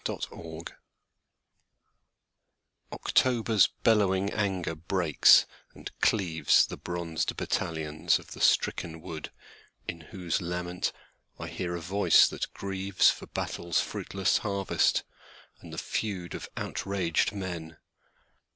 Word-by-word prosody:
Autumn 80 0 -6 2.3
OCTOBER'S 115 -5 +3 0.2
bellowing 100 -3 +3
anger 95 -5 -1
breaks 85 -1 +5 0.3
and - - -8
cleavesThe 90 -7 +3
bronzed 85 -2 -3
battalions 75 -1 0
of - - -14
the - - -8
stricken 80 -1 +2
woodIn 80 +1 -10
whose 90 0 -2
lament 90 +1 -2 0.5
I - - -6
hear 85 -1 -3
a 85 - -5
voice 95 +5 +5
that - - -4
grievesFor 95 -1 +1
battle's 85 -2 -1
fruitless 95 -1 0
harvest, 100 -2 +1 0.6
and - - -12
the - - -8
feudOf 95 -6 -3
outraged 95 -2 -1
men. 85 -5 -6
90 Hz, 95 wpm, -28 LUFS, 85-100 Hz, 2.3 s, breaks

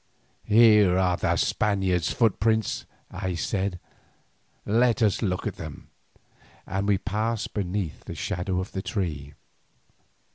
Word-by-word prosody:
"Here 105 -4 +6
are 90 -1 +2
the - - 0
Spaniard's 95 -6 +1
footprints," 110 -1 +1 0.2
I 95 -1 -3
said. 95 0 -2 0.9
"Let 120 +2 +3
us 105 -1 +2
look 90 -4 -1
at - - -3
them," 75 -2 -9 0.7
and 100 +1 -2
we 100 -1 +3
passed 110 +3 -2
beneath 95 -4 -3
the - - -7
shadow 90 +1 -2
of 95 - -5
the 95 - -3
tree. 75 -10 -4
100 Hz, 120 wpm, -26 LUFS, 90-110 Hz, 0.9 s, Here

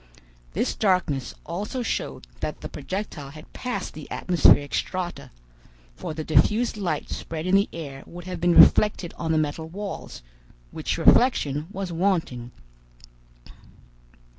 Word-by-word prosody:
This - - 0
darkness 175 - 0
also 210 +9 -3
showed - - -3
that - - -4
the - - -6
projectile 185 -8 -5
had 155 +2 -13
passed 250 -1 -4
the 155 -2 -9
atmospheric 145 -5 +4
strata, 180 -2 -3 0.7
for 155 - -6
the 155 - -3
diffused 215 +10 +3
light 195 -4 -2
spread 160 0 -5
in 185 - 0
the 200 +1 +4
air 140 -5 -7
would 175 0 -10
have 180 -2 -5
been 175 0 +3
reflected 200 -5 +6
on 160 -1 -1
the 160 - +3
metal 155 +1 -1
walls, 195 - -6 0.5
which - - -2
reflection 155 - +4
was 190 -2 -4
wanting. 165 -10 0
175 Hz, 135 wpm, -25 LUFS, 155-195 Hz, 0.7 s, reflected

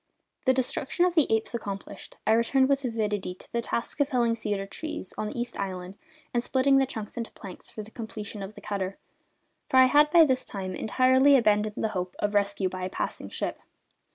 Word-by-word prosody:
The 260 - +5
destruction 265 +6 +1
of 360 - +1
the 315 -8 +3
apes 220 +2 +1
accomplished, 200 -3 -6
I - - +3
returned 260 +4 +3
with 275 0 +2
avidity 210 -6 -2
to - - -18
the 235 - 0
task 235 +5 -3
of 285 -1 +2
felling 240 -4 +2
the - - +1
cedar 205 -3 -2
trees 250 - -6
on 215 - -3
East 240 0 -4
Island 185 -2 -4 0.4
and 240 - +2
splitting 270 +2 +3
the 270 - +2
trunks 220 -5 -7
into 230 -1 -3
planks 190 -3 -10
for 215 - -7
the 215 - -13
completion 215 -2 -7
of 195 +2 -7
the - - -11
cutter 195 -1 -3 0.7
for 260 - +3
I 260 - +9
had 295 +3 +5
by 330 +1 +7
this 260 -3 +1
time 190 -2 -5
entirely 260 +7 +4
abandoned 210 -2 +2
the 220 - +1
hope 180 -3 -4
of 205 0 -1
rescue 200 -1 +1
by 185 0 -5
a 185 - -2
passing - - -4
ship. - - -3
225 Hz, 210 wpm, -27 LUFS, 200-260 Hz, 0.7 s, I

